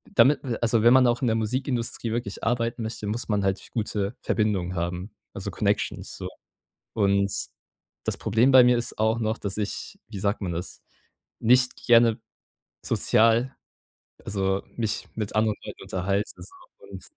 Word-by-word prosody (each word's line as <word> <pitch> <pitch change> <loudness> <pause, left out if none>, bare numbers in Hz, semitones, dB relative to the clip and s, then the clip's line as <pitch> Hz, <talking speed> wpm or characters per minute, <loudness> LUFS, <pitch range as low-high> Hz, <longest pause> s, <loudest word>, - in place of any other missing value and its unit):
damit 135 +4 +6 0.2
also, 115 -1 +3
wenn 120 +2 +6
man 130 -1 +6
auch 120 0 +1
in 130 - +1
der 110 - +2
Musikindustrie 120 0 -2
wirklich 115 -4 -4
arbeiten 115 0 -1
möchte, 110 -1 -5
muss 115 +5 -3
man 105 -2 0
halt 95 0 -1
gute 105 -1 -2
Verbindungen 95 -5 0
haben, 90 +4 -3 0.2
also - - -5
Connections - - -1
so. - - -5 0.6
Und 100 -1 +2 0.8
das - - -1
Problem 115 +6 +2
bei 130 -1 +9
mir 125 0 +4
ist 120 - -4
auch 110 +1 +2
noch, 110 0 -1
dass 100 -1 -4
ich- 105 -1 -4
wie 105 -3 -6
sagt 100 +2 -1
man 90 -3 -2
das- 85 +2 -6 0.6
nicht 125 +2 +4
gerne, 115 -2 +5 0.7
sozial 115 +4 +3 0.7
also, 95 -1 -1
mich 110 -3 -2
mit 105 -2 -4
anderen 110 -1 +2
Leuten - - -9
unterhalte 100 +3 -1
so 375 - -13 0.3
und - - -9
110 Hz, 155 wpm, -25 LUFS, 100-120 Hz, 0.8 s, bei